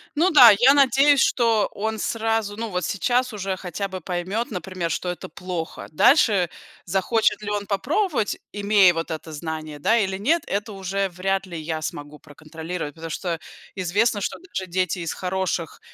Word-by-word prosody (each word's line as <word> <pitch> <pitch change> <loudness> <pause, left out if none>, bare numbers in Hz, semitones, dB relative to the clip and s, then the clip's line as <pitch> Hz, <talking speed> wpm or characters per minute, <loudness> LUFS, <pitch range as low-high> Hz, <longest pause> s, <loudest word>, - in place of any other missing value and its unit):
Ну 350 +5 +3
да, 250 -7 +10
я 265 +3 +7
надеюсь, 275 +1 +5
что 230 -4 +2
он 220 +1 -3
сразу 225 -2 -1
ну 225 -1 -4
вот 180 -1 -2
сейчас 250 +5 0
уже 195 -2 -3
хотя 190 +2 -4
бы 185 -1 -7
поймет, 185 +7 -3
например, 185 -3 -4
что 180 - -2
это 180 - -6
плохо. 170 0 -6
Дальше 200 - +4 0.4
захочет 195 +5 +1
ли 205 - -4
он 205 -1 -3
попробовать, 275 - 0
имея 200 -3 +4
вот 165 0 -4
это 160 0 -6
знание, 155 0 -6
да 225 +10 +3
или 190 -2 -1
нет, 310 - +1
это 205 +2 -3
уже 195 0 -2
вряд 190 +2 -2
ли 170 -3 -7
я 155 0 -4
смогу 145 -1 -6
проконтролировать. 160 +1 -7
Потому 165 0 -7
что 170 -2 -3 0.4
известно, 205 +4 +1
что - - -3
даже 190 - -6
дети 185 0 -1
из 165 -2 -3
хороших 185 -3 -3
190 Hz, 170 wpm, -23 LUFS, 170-220 Hz, 0.4 s, да